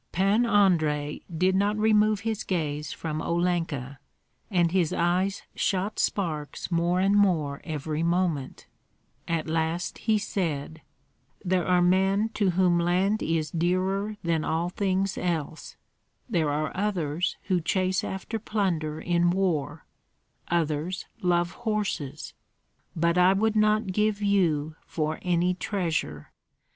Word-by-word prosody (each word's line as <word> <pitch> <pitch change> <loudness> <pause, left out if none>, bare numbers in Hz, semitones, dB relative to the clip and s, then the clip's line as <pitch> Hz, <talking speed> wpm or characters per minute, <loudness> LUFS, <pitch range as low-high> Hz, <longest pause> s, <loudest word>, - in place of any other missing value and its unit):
Pan 200 +6 +2
Andrei 155 -9 +2
did 180 +3 +2
not 205 +2 +1
remove 215 -1 +3
his 220 -1 -2
gaze 150 -5 -2
from 155 -1 -4
Olenka, 165 -7 -1 0.5
and 175 -5 +2
his 180 -4 +2
eyes 185 +3 0
shot 195 +2 -1
sparks 160 -5 -2
more 170 +1 +1
and 195 +2 +3
more 165 -9 +2
every 155 0 -3
moment; 170 -5 -1 0.6
at 165 -1 -1
last 160 +2 -1
he 220 -1 +2
said, 160 -6 -3 0.6
"There 180 -2 +1
are 180 -1 +4
men 190 +4 +3
to 210 -3 0
whom 175 -1 +3
land 185 +5 +1
is 160 -1 -1
dearer 190 +5 0
than 165 -2 0
all 165 +2 -1
things 190 0 -1
else; 160 -3 -3 0.5
there 170 -10 +1
are 150 +1 -2
others 180 -5 -1
who 180 -2 0
chase 185 +3 0
after 205 +4 -4
plunder 170 -8 -1
in 175 0 +2
war, 175 -5 -1 0.6
others 165 +1 -1 0.2
love 175 -1 +1
horses; 205 - -3 0.6
but 170 +2 +2
I 180 +1 +6
would 220 +2 +1
not 215 -2 +2
give 210 +1 +1
you 165 -7 +1
for 155 -1 -2
any 180 0 +1
treasure. 165 - -3
175 Hz, 125 wpm, -26 LUFS, 160-195 Hz, 0.6 s, I